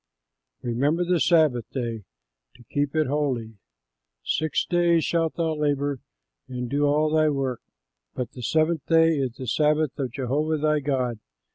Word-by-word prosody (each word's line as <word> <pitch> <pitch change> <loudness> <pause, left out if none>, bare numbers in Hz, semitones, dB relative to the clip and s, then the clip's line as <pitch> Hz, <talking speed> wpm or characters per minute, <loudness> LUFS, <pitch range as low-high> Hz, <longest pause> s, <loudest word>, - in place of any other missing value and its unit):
"REMEMBER 140 +9 0
THE 175 -1 +2
SABBATH 150 -7 +3
DAY 115 -6 -4 0.5
TO 120 - -17
KEEP 145 +1 -1
IT 155 -1 +3
HOLY. 130 -7 -2 0.6
Six 155 +1 0
days 170 -2 +2
shalt 165 -2 0
thou 165 -2 0
labor 145 -2 -1 0.5
and 125 -1 -4
do 145 +4 +1
all 150 +1 +2
thy 155 0 +3
work; 135 -4 -2 0.5
but 125 - -4
the 125 - -10
seventh 155 +3 +1
day 165 -2 +4
is 130 -3 -1
the 130 - -8
Sabbath 150 +3 +2
of 130 -4 -2
Jehovah 140 +5 -1
thy 150 0 +1
God. 130 -5 -1
145 Hz, 150 wpm, -25 LUFS, 125-155 Hz, 0.6 s, day